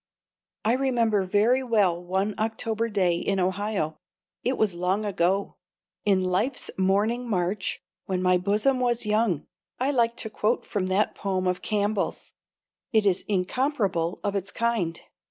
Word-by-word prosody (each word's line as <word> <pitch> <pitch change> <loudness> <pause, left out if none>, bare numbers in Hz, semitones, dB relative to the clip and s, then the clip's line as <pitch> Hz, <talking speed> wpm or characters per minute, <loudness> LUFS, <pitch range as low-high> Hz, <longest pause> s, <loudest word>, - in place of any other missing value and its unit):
I 225 - +4
remember 235 -6 +2
very 215 +7 +3
well 200 -8 +2
one 190 +4 -1
October 225 +1 -1
day 185 -5 +2
in 195 +2 -1
Ohio. 185 -4 -1 0.4
It 255 - 0
was 215 -4 +2
long 185 +4 0
ago 195 0 0 0.5
"in 195 -2 +3
life's 190 +9 0
morning 210 +6 +1
march, 185 0 -1 0.2
when 185 -1 -1
my 180 0 +3
bosom 210 +8 +2
was 240 -2 0
young." 210 -7 +1 0.3
(I 265 +3 +1
like 235 -3 +1
to 220 - -1
quote 215 +3 0
from 195 -4 -2
that 190 +3 +1
poem 190 -2 -2
of 180 0 0
Campbell's, 205 -1 -1 0.6
it 220 -2 +3
is 190 -2 +2
incomparable 195 - 0
of 205 0 -1
its 195 0 -2
kind.) 225 -8 -1
205 Hz, 145 wpm, -26 LUFS, 185-230 Hz, 0.6 s, I